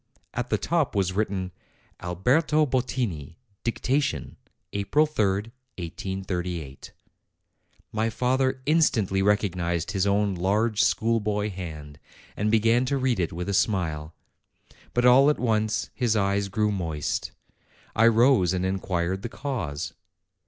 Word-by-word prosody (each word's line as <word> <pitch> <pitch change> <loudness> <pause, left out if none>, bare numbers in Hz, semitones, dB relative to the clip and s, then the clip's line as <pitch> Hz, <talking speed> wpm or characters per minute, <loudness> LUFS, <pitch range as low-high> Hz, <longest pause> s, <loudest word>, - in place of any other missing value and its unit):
At 125 +1 -3
the - - +2
top 160 -7 0
was 95 -2 +1
written, 95 -2 -1 0.5
Alberto 130 - +2
Bottini, 120 - -2 0.3
Dictation, 125 - -1 0.4
April 100 +10 +2
3, 105 -7 0 0.3
1838. 90 -4 -5 1.0
My 110 +1 0
father 130 +2 0
instantly 115 - +2
recognized 90 -4 0
his 100 -1 0
own 100 0 +2
large, 105 +5 +1
schoolboy 105 -2 +1
hand, 75 -6 -8 0.4
and 105 +1 0
began 115 +3 +3
to 140 +2 0
read 130 -5 0
it 85 - 0
with 90 +3 -5
a 100 - -1
smile. 80 -6 0 0.8
But 120 0 +2
all 135 +3 +7
at 150 - +2
once 110 -2 0
his 120 -3 0
eyes 100 -1 +1
grew 105 +2 +1
moist. 80 -7 -2 0.6
I 115 +1 +5
rose 115 -6 +4
and 95 0 -1
inquired 95 -1 -1
the 120 - -5
cause. 105 - -4
105 Hz, 125 wpm, -26 LUFS, 90-120 Hz, 1.0 s, all